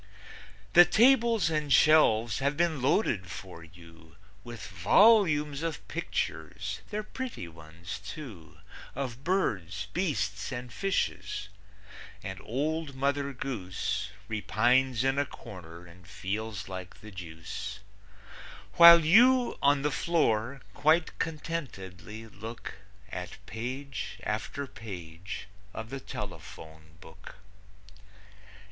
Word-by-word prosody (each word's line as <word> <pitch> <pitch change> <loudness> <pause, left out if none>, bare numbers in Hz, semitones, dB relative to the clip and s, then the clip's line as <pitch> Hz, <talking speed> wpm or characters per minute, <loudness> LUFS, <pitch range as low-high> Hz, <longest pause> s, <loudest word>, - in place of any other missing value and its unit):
The 175 - +10
tables 230 -5 +4
and 150 -2 -1
shelves 120 -8 +5
have 140 +1 0
been 165 -5 +1
loaded 125 - +1
for 90 -2 -9
you 80 -1 -16 0.3
With 120 -2 -8
volumes 150 - +4
of 165 -2 -4
pictures 95 +5 -3
they're 210 0 -3
pretty 250 - -6
ones, 80 +3 -9
too 100 - -9 0.4
Of 130 -1 -4
birds, 100 - -1
beasts, 145 - -1
and 125 -1 -6
fishes, 105 - -2 0.7
and 95 0 -6
old 150 +4 -2
Mother 140 +1 0
Goose 110 -8 -3 0.2
Repines 120 +4 +2
in 135 +1 +2
a 145 - +2
corner 90 -8 -11
and 85 0 -16
feels 100 +2 -4
like 95 -2 -8
the 110 - -11
deuce, 80 -3 -7 1.0
While 170 -1 +10
you, 245 +8 +5
on 140 0 +4
the 150 - +1
floor, 135 -6 +1
quite 160 +2 +2
contentedly 115 - -5
look 110 +2 -8 0.4
At - - -6
page 130 +4 -5
after 140 - -3
page 90 -7 -8 0.3
of 110 +2 -6
the 135 - -4
telephone 80 -9 -9
book. 80 -3 -13
120 Hz, 105 wpm, -29 LUFS, 95-155 Hz, 1.0 s, The